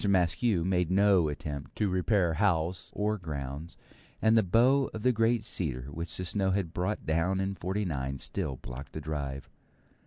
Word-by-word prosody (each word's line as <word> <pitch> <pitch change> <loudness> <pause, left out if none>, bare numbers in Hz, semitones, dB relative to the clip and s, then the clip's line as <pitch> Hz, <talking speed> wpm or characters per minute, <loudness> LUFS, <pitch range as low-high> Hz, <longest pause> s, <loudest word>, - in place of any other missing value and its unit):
Maskew 95 +1 +2
made 90 -2 +1
no 95 -3 +4
attempt 75 -2 -6
to 105 - +1
repair 95 -1 +2
house 90 -1 +1
or 105 +1 0
grounds, 75 0 -6 0.4
and 110 0 +4
the 110 - +6
bough 125 +8 +4
of 110 - -5
the 125 - +5
great 115 0 +2
cedar 65 -7 -3
which 80 0 -5
the 90 - -3
snows 95 +1 +1
had 90 -5 -2
brought 90 +4 -2
down 85 +4 +1
in 95 0 -1
'49 85 -8 -2
still 65 - -3
blocked 65 +2 -9
the - - -4
drive. 70 -3 -4
90 Hz, 165 wpm, -30 LUFS, 75-100 Hz, 0.4 s, the